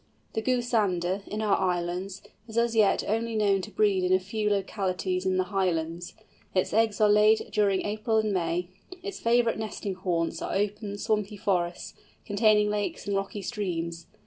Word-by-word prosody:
The 220 - -1
Goosander, 210 -7 +1
in 215 +1 -3
our 205 -2 +3
islands, 180 +2 -2 0.2
is 220 0 -7
as 235 0 +2
yet 215 -3 +4
only 225 +2 -1
known 200 -2 +2
to 200 - -7
breed 205 -3 +2
in 180 - +1
a 185 - +5
few 210 +3 -2
localities 190 -2 -1
in 185 0 +1
the 185 - +3
Highlands. 170 -2 -1 0.4
Its 185 - +1
eggs 220 -1 +2
are 215 - +5
laid 210 +1 +4
during 200 -2 +2
April 215 +2 0
and 215 -1 +1
May. 175 0 -1 0.3
Its 405 -1 -5
favourite 230 -1 +2
nesting 210 -2 -4
haunts 175 -3 -2
are - - -3
open, 205 +1 -2
swampy 210 0 -1
forests, 180 -4 -1 0.3
containing 210 0 +3
lakes 205 -1 -2
and 200 - -1
rocky 195 +1 -3
streams. 170 -7 -3
205 Hz, 170 wpm, -27 LUFS, 185-215 Hz, 0.4 s, a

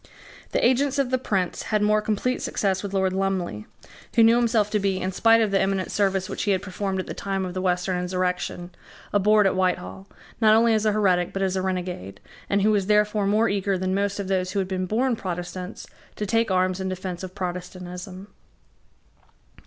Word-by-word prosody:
The - - +1
agents 270 +2 +1
of 270 -2 0
the 255 - +2
Prince 190 -7 -1
had 215 -1 +2
more 210 0 +3
complete 220 +4 -1
success 190 -2 -1
with 200 - -5
Lord 190 -1 +1
Lumley, 185 - -2 0.5
who 230 - +6
knew 225 +1 +6
himself 225 -3 +2
to 210 - +1
be, 195 -1 0
in 185 - -2
spite 225 +4 +4
of 215 -2 +1
the 195 - +3
eminent 195 -1 -1
service 195 -2 +1
which - - -4
he 205 - +1
had 185 - -1
performed 190 0 -3
at 185 - -3
the - - -6
time 195 -1 -3
of 180 - -5
the 185 - -3
Western 180 0 0
insurrection, 180 -1 -2 0.4
abhorred 210 +1 +4
at 195 - +2
Whitehall, 95 - -1 0.3
not 215 -1 +6
only 230 0 +4
as 215 0 +1
a - - +4
heretic 185 -4 +1
but 195 - -1
as 190 -1 0
a 190 - 0
renegade, 180 - -4 0.3
and 200 0 +2
who 215 - +4
was 200 -3 +1
therefore 210 -1 +2
more 215 +3 +3
eager 195 -1 0
than 185 +1 -1
most 200 +1 -1
of 200 - -3
those 185 -1 -1
who - - -2
had 190 -1 0
been 185 -1 -2
born 240 +5 +1
Protestants 180 -2 -6 0.3
to 210 - -3
take 225 +2 +1
arms 185 0 +1
in 190 0 -2
defence 185 -1 -5
of 185 0 -8
Protestantism. 180 +1 -6
195 Hz, 210 wpm, -24 LUFS, 185-210 Hz, 0.5 s, who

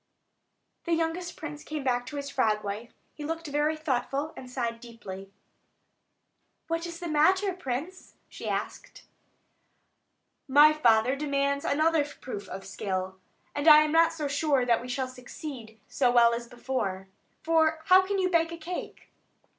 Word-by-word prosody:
The 340 -1 +2
youngest 330 +2 -2
prince 300 -1 -7
came 305 -2 -5
back 245 -2 0
to 295 - -7
his 280 -1 -4
frog 215 -5 +1
wife; 210 +4 -5 0.2
he 300 - -9
looked 325 +2 -4
very 295 +1 0
thoughtful, 285 0 -2
and 255 - -10
sighed 235 -2 -3
deeply. 195 -5 -10 1.4
"What 330 +1 -2
is 335 0 -8
the 345 - -5
matter, 375 +6 +3
prince?" 330 +2 -6
she - - -7
asked. - - -5 1.4
"My 295 +3 +7
father 245 -3 +3
demands 280 -1 -1
another 310 +1 +2
proof 255 -7 -8
of 195 +1 -7
skill; 190 -1 -4 0.3
and 290 +2 -2
I 305 -1 +9
am 305 - -1
not 330 +1 +5
so 310 -3 -3
sure 280 -2 +1
that 235 -2 +2
we 250 - -8
shall 260 +1 -2
succeed 250 -3 -9
so 255 -3 +1
well 235 -1 +5
as 235 0 -4
before; 235 -6 -3 0.4
for 320 -1 +2
how 370 +2 +7
can 395 +1 -2
you 375 -1 +2
bake 335 -2 +2
a 335 - -6
cake?" 345 +2 -7
285 Hz, 155 wpm, -28 LUFS, 240-325 Hz, 1.4 s, I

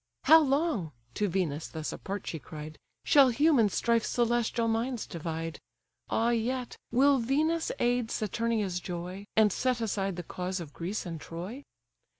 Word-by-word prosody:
"How 320 +1 +8
long 275 - 0 0.2
(to 210 - 0
Venus 165 -5 -1
thus 155 -1 -5
apart 200 0 -5
she 160 - -4
cried) 150 +3 -9 0.3
Shall 280 -4 +7
human 265 -3 +4
strife 230 +3 +1
celestial 235 -1 +1
minds 230 +1 -1
divide? 165 -1 -5 0.5
Ah 230 +1 +2
yet, 245 +2 -1 0.2
will 270 +3 +5
Venus 310 +7 +1
aid 245 -1 +1
Saturnia's 215 -4 -1
joy, 180 +3 -6
And 215 -3 +5
set 255 -1 0
aside 195 -4 -1
the 175 - -5
cause 180 +2 -4
of 155 -4 -8
Greece 190 +6 -4
and 165 -3 -6
Troy?" 185 - -7
220 Hz, 150 wpm, -29 LUFS, 175-245 Hz, 0.5 s, How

